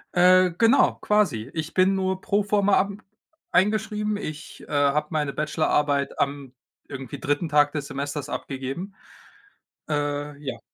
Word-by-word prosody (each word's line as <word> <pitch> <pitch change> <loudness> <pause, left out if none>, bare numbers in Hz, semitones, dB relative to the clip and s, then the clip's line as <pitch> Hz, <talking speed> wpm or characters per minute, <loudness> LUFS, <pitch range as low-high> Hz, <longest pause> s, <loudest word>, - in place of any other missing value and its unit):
Äh, 185 0 +6
genau, 230 +4 +4
quasi. 150 - +1
Ich 160 0 -4
bin 190 +1 +3
nur 190 0 -1
pro 205 +1 +1
forma 205 -1 +2
ab 200 +1 +1 0.6
eingeschrieben. 210 +2 +1
Ich, 155 -6 -8
äh, - - -14
habe 145 +1 +2
meine 150 -3 -1
Bachelorarbeit 150 -2 0
am 140 -2 -2 0.3
irgendwie 135 -3 -7
3. 145 +4 -1
Tag 145 -1 +4
des 145 -2 -4
Semesters 140 +1 -4
abgegeben. 135 +9 -5 1.0
Äh, 145 -1 -2
ja. 125 -4 -5
150 Hz, 135 wpm, -24 LUFS, 145-190 Hz, 1.0 s, Äh